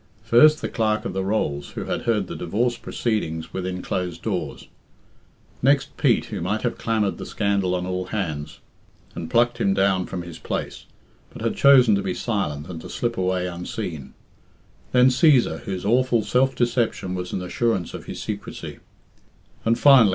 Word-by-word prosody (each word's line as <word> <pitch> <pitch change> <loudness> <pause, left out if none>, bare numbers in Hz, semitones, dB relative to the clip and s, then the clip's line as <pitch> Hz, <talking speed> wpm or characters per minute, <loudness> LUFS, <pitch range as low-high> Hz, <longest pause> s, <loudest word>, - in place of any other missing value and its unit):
First, 150 +7 +6
the - - 0
Clerk 110 -1 0
of - - -3
the 95 0 -1
Rolls, 85 -8 -2
who - - -3
had - - -2
heard 110 -4 +1
the - - -7
divorce 115 +8 0
proceedings 105 -11 -3
within 90 -1 -4
closed 90 -2 -3
doors; - - -3 0.9
next 140 +1 +2
Pete, 125 -6 +2
who 105 -5 -5
might 100 +5 -1
have 120 - -2
clamoured 110 -3 0
the - - -5
scandal 100 -3 0
on 90 0 -2
all 90 0 -2
hands, 85 -8 -4 0.5
and 80 - -6
plucked 120 0 +2
him 100 -4 +2
down 95 -1 +2
from 90 -2 -5
his 85 -2 -9
place, - - -5 0.4
but - - -9
had - - 0
chosen 130 -5 +6
to 100 - +2
be 95 -2 -2
silent 80 -10 -2
and 85 -3 -7
to - - -9
slip 120 -1 -2
away 90 -1 0
unseen; 85 -5 -5 0.8
then 125 0 +6
Cæsar, 130 -1 +4
whose 95 -3 -4
awful 120 0 +3
self 125 +6 +2
deception 120 -6 0
was 90 -1 -4
an 90 - -3
assurance 95 -1 -1
of - - -8
his - - -7
secrecy; - - -6 0.8
and, 115 +1 +2
finally. 135 -7 +7
100 Hz, 175 wpm, -23 LUFS, 90-120 Hz, 0.9 s, finally